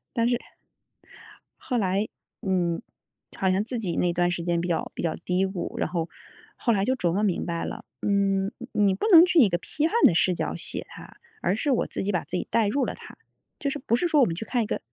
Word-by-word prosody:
但 230 0 +1
是 245 - +2 1.2
后 250 -4 -1
来， 195 +1 +1 0.4
嗯， 180 -1 0 0.5
好 190 - +1
像 190 +2 +2
自 240 +2 -3
己 180 -6 -2
那 175 -1 +2
段 175 0 +1
时 175 -1 -3
间 170 -1 0
比 175 - -3
较 165 - -1
比 - - -4
较 165 - 0
低 185 +1 +1
谷。 190 -2 -5
然 - - 0
后， 170 -2 -2 0.5
后 235 - +1
来 195 -2 +1
就 260 - +1
琢 175 -10 0
磨 205 +3 0
明 195 -5 0
白 170 -1 -3
了， 220 +1 -6 0.2
嗯， 195 -1 +1
你 245 - -9 0.2
你 195 -1 +4
不 195 - -2
能 335 0 +10
去 355 -2 +2
以 280 - +9
一 205 - +3
个 175 - 0
批 300 - -1
判 370 - -3
的 - - +7
视 180 +2 +3
角 - - -2
写 - - -3
他， - - -12 0.3
而 190 - +2
是 280 +7 -1
我 255 - +2
自 - - -4
己 200 +1 -1
把 175 - 0
自 - - -4
己 - - -3
带 220 -3 +2
入 275 +6 +1
了 - - -3
他， - - -13 0.4
就 280 - -1
是 290 - -3
不 235 -2 +1
是 350 - 0
说 310 -3 +4
我 255 - +6
们 165 - -2
去 185 - -5
看 240 0 0
一 - - -2
个 - - -2
195 Hz, 275 characters per minute, -26 LUFS, 175-240 Hz, 1.2 s, 能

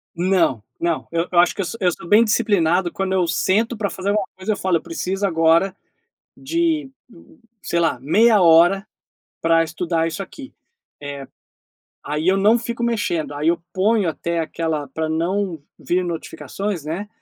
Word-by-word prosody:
Não, 170 - +1 0.2
não, 170 -1 -1
eu 165 +1 0
eu 175 - +1
acho 175 - +5
que - - -5
eu - - 0
sou 230 +6 -6
eu 180 -1 +3
sou 170 - -10
bem 220 +5 +6
disciplinado 190 -6 +1
quando 190 -1 -2
eu 185 -2 +2
sento 220 +8 +1
pra 205 -2 -2
fazer 190 +1 -5
alguma 205 -2 0
coisa 190 +3 -2
eu - - -2
falo: 185 -2 +1
"Eu - - -2
preciso 190 +4 -2
agora 165 +3 +2 0.6
de, 315 0 -1 0.7
sei 170 - -1
lá, 160 -7 +1
meia 210 - +4
hora 175 +4 +5 0.5
pra 165 0 +3
estudar 165 0 -1
isso 165 +4 -4
aqui." 265 +7 -11 0.5
Eh, 140 -1 -6 0.8
aí 150 +4 -2
eu 190 +1 +4
não 215 +4 +4
fico 235 0 -4
mexendo, 190 -10 -1
aí 150 +3 0
eu 170 0 0
ponho 200 -1 +2
até 170 +3 -3
aquela 160 -2 -2
pra 160 +3 -3
não 175 +1 -1 0.2
vir 180 +1 -1
notificações, 170 +1 -5
né, 180 +7 -4
180 Hz, 170 wpm, -21 LUFS, 165-205 Hz, 0.8 s, bem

